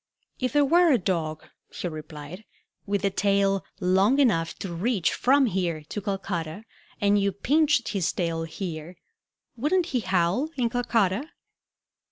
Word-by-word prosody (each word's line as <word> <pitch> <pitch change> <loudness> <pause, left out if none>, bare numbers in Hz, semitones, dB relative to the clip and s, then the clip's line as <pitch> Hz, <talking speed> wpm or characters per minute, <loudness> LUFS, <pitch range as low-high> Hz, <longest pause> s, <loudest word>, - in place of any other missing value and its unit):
"If 255 +1 -1
there 290 -1 +4
were 340 +3 +5
a 260 - +5
dog," 165 -6 -2 0.2
he - - -4
replied, 155 +3 -8 0.4
"with 200 0 0
a 195 - +2
tail 195 0 +1 0.2
long 190 +7 +3
enough 185 -13 +2
to 185 -3 -5
reach 190 0 0
from 275 +2 +3
here 175 -7 -1
to 210 - -4
Calcutta, 190 -2 -4 0.4
and 205 -1 +3
you 200 0 +1
pinched 290 +6 +2
his 195 -6 0
tail 165 -2 -2
here, 165 0 -6 0.6
wouldn't 320 +9 +1
he 250 - +2
howl 190 - +1
in 235 -3 0
Calcutta?" 235 - 0
195 Hz, 145 wpm, -26 LUFS, 170-245 Hz, 0.6 s, were